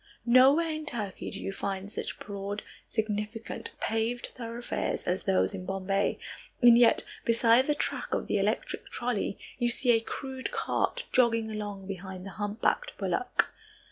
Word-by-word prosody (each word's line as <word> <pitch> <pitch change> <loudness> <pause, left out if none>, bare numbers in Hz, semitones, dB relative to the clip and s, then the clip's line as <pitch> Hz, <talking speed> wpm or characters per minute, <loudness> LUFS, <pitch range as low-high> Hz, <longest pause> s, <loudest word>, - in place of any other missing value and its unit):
Nowhere 270 +7 +6
in 310 0 -5
Turkey 215 -9 -4
do - - -5
you - - -3
find 195 0 -3
such - - -4
broad, 200 0 -5 0.3
magnificent, 215 +1 -3
paved 225 +2 -1
thoroughfares 235 0 -3
as 180 +1 -1
those 195 +1 +2
in 190 -2 -5
Bombay, 195 +1 0 0.4
and 240 -2 +8
yet, 235 -1 +5 0.2
beside 230 +2 +4
the 295 - +2
track - - -2
of - - 0
the - - +1
electric - - -1
trolley, 240 -5 -2 0.2
you 240 -1 +2
see 245 +1 +4
a 225 - +5
crude 260 - -5
cart 475 +1 -1
jogging 230 -3 +3
along 205 -2 -5
behind 190 -1 -6
the 195 - -7
humpbacked 210 - -1
bullock. - - 0
225 Hz, 150 wpm, -29 LUFS, 200-245 Hz, 0.4 s, and